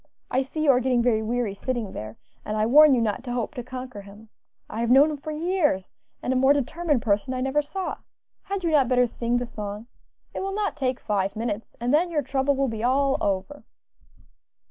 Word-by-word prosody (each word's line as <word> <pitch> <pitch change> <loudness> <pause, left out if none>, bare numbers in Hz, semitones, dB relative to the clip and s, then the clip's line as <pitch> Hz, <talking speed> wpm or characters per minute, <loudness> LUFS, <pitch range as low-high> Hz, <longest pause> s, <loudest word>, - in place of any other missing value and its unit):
I 260 - +2
see 295 +4 -4
you 290 - +6
are 250 - +3
getting 250 -2 +1
very 230 -3 +2
weary 230 -1 -1
sitting 230 0 -3
there, 110 +1 -7 0.3
and 215 - -3
I 215 - +2
warn 290 +4 +7
you 240 - +1
not 225 +2 -1
to 245 - -3
hope 245 +3 -2
to 255 - -5
conquer 255 -3 -7
him. 205 +2 -14 0.4
I 220 - -6
have 235 0 0
known 280 +5 +6
him 300 - -4
for 285 - -8
years, 305 - 0 0.3
and 255 - 0
a - - -1
more 265 +2 +5
determined 290 0 0
person 210 +5 0
I 255 - -2
never 270 +3 +1
saw. 375 +6 -4 0.4
Had 395 -1 -4
you 335 - +1
not 285 -5 +4
better 250 0 +4
sing 240 0 -1
the 245 - -2
song? 210 -2 -6 0.5
it - - -4
will 390 0 -3
not 420 -1 -1
take 260 -4 -1
five 200 -2 -1
minutes, 225 -1 -4
and 240 +3 0
then 340 +4 +3
your 305 -4 0
trouble 270 +2 +1
will 275 0 +1
be 225 -2 -4
all 270 +2 +2
over." 200 +8 -2
255 Hz, 220 wpm, -25 LUFS, 225-290 Hz, 0.5 s, warn